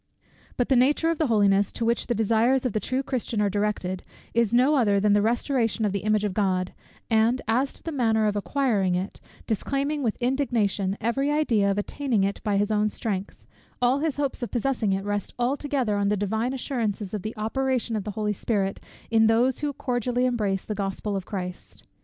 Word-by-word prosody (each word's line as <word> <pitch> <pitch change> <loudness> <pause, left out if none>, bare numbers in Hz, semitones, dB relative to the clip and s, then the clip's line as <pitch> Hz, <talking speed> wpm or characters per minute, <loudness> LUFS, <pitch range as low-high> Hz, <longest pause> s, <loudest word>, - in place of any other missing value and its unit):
_But 245 - 0
the 265 - +4
nature 290 +6 +3
of 330 - -3
the 315 - +2
holiness, 200 -3 +3
to 230 - -2
which 235 +1 0
the 240 - 0
desires 230 +4 +2
of 245 - 0
the 215 - +1
true 255 +5 -1
Christian 245 -5 -2
are 205 -1 +2
directed, 205 -3 -1 0.3
is 230 -2 +2
no 255 +5 +4
other 210 -8 +3
than 205 +1 +3
the 205 - +4
restoration 235 0 +1
of 205 - +1
the 200 - -1
image 215 +1 +1
of 205 -3 -1
God: 185 -2 0 0.4
and 225 +3 +3
as 255 +5 +1
to - - -14
the 330 - -4
manner 225 -6 +2
of 210 -1 +1
acquiring 205 -5 +1
it, 185 +3 -4 0.2
disclaiming 275 +6 -1
with 230 -5 -1
indignation 230 -7 0
every 270 +6 0
idea 240 -10 +2
of 195 - 0
attaining 225 0 0
it 200 +1 -1
by 205 -2 +1
his 205 +2 +1
own 215 0 +2
strength, 205 -3 -4 0.3
all 250 +3 +3
his 305 -2 -1
hopes 280 -2 -1
of 240 - -3
possessing 240 -4 0
it 195 +1 -1
rest 205 0 -3
altogether 260 -2 0
on 200 0 +1
the 210 - +1
divine 220 +5 -1
assurances 225 -7 -3
of 210 - -2
the 215 +3 -6
operation 245 +1 -1
of 210 - -2
the 210 - -5
Holy 210 -1 0
Spirit, 195 -1 -1 0.3
in 225 -1 +5
those 240 +3 +3
who 295 -1 -1
cordially 250 -1 -1
embrace 210 -6 0
the 215 - -3
Gospel 200 0 -3
of 190 -2 -4
Christ. 180 -3 -6
220 Hz, 205 wpm, -25 LUFS, 205-255 Hz, 0.4 s, in